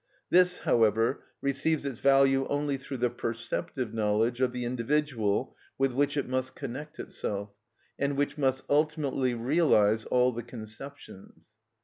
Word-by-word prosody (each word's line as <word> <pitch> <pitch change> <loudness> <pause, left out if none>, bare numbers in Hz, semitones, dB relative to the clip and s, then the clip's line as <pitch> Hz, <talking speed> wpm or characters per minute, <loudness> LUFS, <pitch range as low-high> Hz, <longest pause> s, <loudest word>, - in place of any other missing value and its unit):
This, 180 0 +4
however, 115 +2 +2 0.2
receives 140 +2 0
its 135 -5 -4
value 135 -1 +4
only 145 0 0
through 135 0 -6
the 120 -1 +1
perceptive 120 +2 -3
knowledge 110 +3 +1
of 130 -1 +3
the 125 -1 -4
individual 120 -3 0 0.2
with 135 0 +2
which 145 +3 +1
it 140 - -1
must 130 0 -2
connect 145 +3 -7
itself, 100 0 -4 0.5
and 140 0 0
which 145 0 0
must 130 -3 0
ultimately 145 -4 +1
realise 115 -5 +3
all 125 0 +3
the 120 0 -5
conceptions. 115 -1 -11
130 Hz, 135 wpm, -29 LUFS, 115-140 Hz, 0.5 s, This